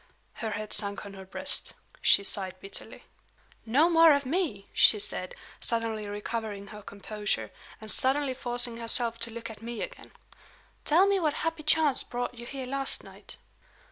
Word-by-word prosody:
Her 225 - -4
head 215 0 -5
sunk 200 -1 -2
on 200 - -9
her 190 -1 -10
breast. 190 - -4 0.3
She 200 - +5
sighed 190 -2 +2
bitterly. 195 - -9 0.6
"No 280 +9 +4
more 330 -2 +7
of 280 -1 0
Me!" 270 - -2
she 215 - +8
said, 185 -2 -3 0.2
suddenly 225 -2 -1
recovering 205 -1 -5
her 210 -1 -10
composure, 210 +1 -4 0.3
and 215 -1 -1
suddenly 270 +1 +4
forcing 245 -2 +1
herself 230 0 -2
to 230 - +1
look 230 0 -7
at 220 - -13
me 235 +1 -5
again. - - -10 0.7
"Tell 340 +6 +5
me 400 -1 +2
what 305 -4 0
happy 325 -1 -2
chance 310 -2 +3
brought 245 0 -4
you 240 -1 -10
here 270 -1 -6
last 270 +1 -2
night?" - - -12
230 Hz, 165 wpm, -28 LUFS, 210-280 Hz, 0.7 s, she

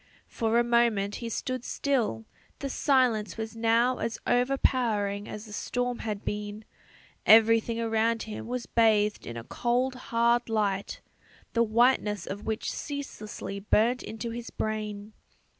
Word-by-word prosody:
For 225 -1 0
a 240 - +5
moment 235 -4 +2
he 235 - -5
stood 255 +2 -3
still; 235 - -1 0.3
the 275 -1 -4
silence 240 - +2
was 220 0 -5
now 230 +2 +2
as 230 - -2
overpowering 235 -6 +1
as 210 +1 -7
the 210 - -11
storm 245 +2 -2
had 210 -2 -4
been; 210 +1 -4 0.6
everything 225 +1 +6
around 225 0 +1
him 220 0 -7
was 250 0 -3
bathed 215 -2 +2
in 115 0 -6
a 115 - -6
cold 245 - 0 0.2
hard 235 +1 +2
light, 205 -3 -1 0.5
the 235 - +2
whiteness 220 -3 +2
of 200 +2 -6
which 220 0 -2
ceaselessly 215 -8 -6
burnt 225 +5 +2
into 225 +1 -5
his 235 0 -6
brain. 215 -1 -4
225 Hz, 140 wpm, -28 LUFS, 210-240 Hz, 0.6 s, everything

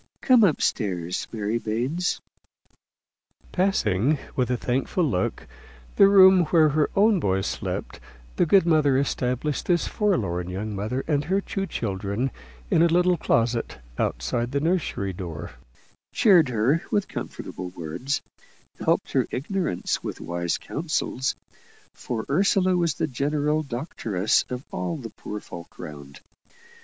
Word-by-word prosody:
Come 250 -4 +5
up 170 -8 +3
stairs, 90 -5 -1
Mary 110 +1 -1
Baines." 125 +12 -1 1.3
Passing, 145 - +2 0.2
with 125 -2 0
a 125 - +1
thankful 130 +9 -1
look, 125 - -1 0.5
the 195 - +7
room 190 -2 +7
where 155 -1 +4
her 150 +1 +1
own 205 0 +4
boys 95 - 0
slept, - - -4 0.4
the - - +3
good 190 +2 +5
mother 155 -5 +3
established 135 +1 -1
this 175 -2 +2
forlorn 95 - 0
young 105 +3 -4
mother 110 +7 -2
and 145 -2 +1
her 190 +5 +1
two 195 0 -3
children 100 - -2 0.4
in - - +4
a 170 - +6
little 180 +2 +3
closet 115 -6 0 0.2
outside 90 - -1
the 140 - +2
nursery 155 - -1
door; 85 -4 -6 0.6
cheered 175 - +5
her 125 +8 +2
with 205 -2 0
comfortable 90 - -6
words; 90 - -4 0.6
helped - - +1
her - - +1
ignorance 165 - -2
with - - -5
wise 85 0 -2
counsels 150 -4 -2 0.6
for 110 -2 -4
Ursula 185 +3 +3
was 170 -4 +1
the - - 0
general 150 +3 0
doctress 120 - -1
of 125 +1 -5
all 90 -2 -3
the - - -8
poor 105 - -7
folk 85 -4 -11
round. 70 -2 -10
130 Hz, 135 wpm, -25 LUFS, 100-170 Hz, 1.3 s, the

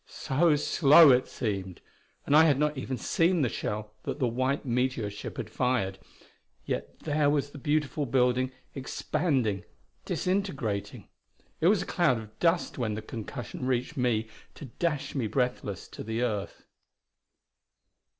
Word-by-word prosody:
So 150 +3 +2
slow 150 +1 +7
it 125 0 +3
seemed! 95 -6 -4 0.5
and 145 - +3
I 160 +1 +8
had 145 -4 +4
not 150 +1 +1
even 130 -1 -4
seen 165 - +2
the 125 - +1
shell 105 0 -4
that - - -4
the 130 -4 +1
white 130 +5 -1
meteor 125 -3 0
ship 100 - -8
had - - -4
fired. 115 -7 -1 0.7
Yet - - -4
there 150 -1 +2
was 145 -1 0
the 145 - -10
beautiful 150 0 0
building, 125 +1 +2 0.2
expanding, 135 - -1 0.4
disintegrating. 150 - -2 0.5
It 165 - +3
was 195 -1 +4
a - - -9
cloud 160 -9 +2
of 110 -1 -11
dust 170 -4 +1
when 110 -4 -1
the 110 - -6
concussion 120 +3 -6
reached 130 +3 -1
me 120 -4 +1 0.3
to 150 - -9
dash 150 +3 -2
me 130 -6 -1
breathless 125 -4 -2
to - - -8
the 115 +2 -2
earth.... 105 -5 -3
130 Hz, 150 wpm, -28 LUFS, 115-150 Hz, 0.7 s, I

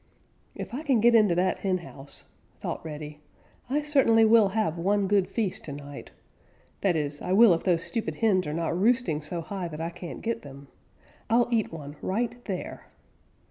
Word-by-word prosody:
"If - - -7
I 265 - -3
can 275 -7 +2
get 235 +2 +5
into 210 -6 +5
that 185 +2 +1
henhouse," 175 -7 -5 0.4
thought - - -5
Reddy, 150 -1 -7 0.5
"I 295 +3 0
certainly 260 -7 +4
will 220 -1 +6
have 190 -5 -1
one 200 +3 +1
good 200 -1 +2
feast 215 -6 -2
to 145 - -6
night. 145 0 -9 0.7
That 190 -4 +2
is, 145 -1 -2
I 180 - -1
will 215 -1 +7
if 165 - -1
those 175 -2 +1
stupid 185 +6 -3
hens 190 -7 +2
are - - -2
not 165 0 -1
roosting 210 -5 +1
so 165 +3 -4
high 185 +1 -5
that 155 -2 -8
I 165 +1 -3
can't 175 0 -8
get 230 0 -2
them. 140 -1 -12 0.6
I'll 235 +1 +3
eat 225 -3 +1
one 145 -2 -8
right 235 +5 -2
there." 190 -3 -6
185 Hz, 180 wpm, -27 LUFS, 160-225 Hz, 0.7 s, will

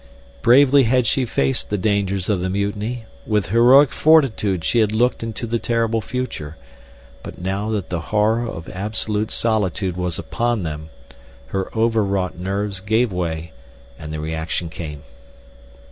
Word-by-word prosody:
Bravely 135 +2 +6
had 125 +1 +2
she 130 +3 +1
faced 70 - -1
the 105 - 0
dangers 100 -2 0
of 100 -4 0
the 95 - -1
mutiny; 105 +4 -2 0.2
with 105 -5 0
heroic 125 +5 +6
fortitude 120 - +3
she 120 - +1
had 110 -2 +3
looked 120 +3 +1
into 115 +1 -4
the 115 0 -1
terrible 115 -1 0
future; 105 - -5 0.6
but - - -9
now 95 +4 -2
that 105 -5 -3
the 90 - -1
horror 110 +3 +2
of 80 -7 -7
absolute 105 +2 -1
solitude 100 -4 0
was 90 -2 -2
upon 120 -4 -1
them, 80 -1 -5 0.6
her 95 +5 -2
overwrought 105 -5 +1
nerves 100 +2 -3
gave 110 +4 +1
way, 85 -2 -3 0.5
and 75 -1 -7
the 80 - -4
reaction 80 +2 -3
came. 75 -4 -7
105 Hz, 145 wpm, -21 LUFS, 90-115 Hz, 0.6 s, Bravely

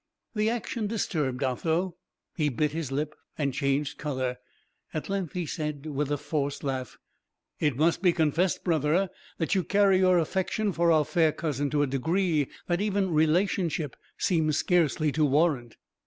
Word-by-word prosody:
The 215 -1 +1
action 235 -1 -2
disturbed 150 - -1
Otho; 165 +7 0 0.4
he 150 -4 +1
bit 150 +3 0
his 155 -3 -4
lip, 150 +2 -2 0.2
and 140 -3 0
changed 140 +1 -1
colour; 130 -4 -2 0.6
at 155 - -3
length 195 -5 -2
he 180 -2 -2
said, 150 -2 -4
with 145 -1 -2
a 145 - +1
forced 145 -1 -2
laugh: 130 -3 -3 0.6
"It 145 -5 +1
must 165 +3 +2
be 180 -2 +5
confessed, 165 +3 +1
brother, 165 +3 +1 0.3
that 165 - 0
you 190 -2 +2
carry 200 0 +4
your 185 -1 +5
affection 190 +5 0
for 170 -1 +2
our 155 -2 +4
fair 160 0 +3
cousin 145 -3 -2
to 145 0 +2
a - - +3
degree 155 +3 +1 0.2
that 175 +1 0
even 200 -3 0
relationship 160 -1 +1 0.2
seems 155 -4 +1
scarcely 160 -4 +2
to 155 +2 +1
warrant." 145 -5 +1
155 Hz, 160 wpm, -28 LUFS, 145-180 Hz, 0.6 s, be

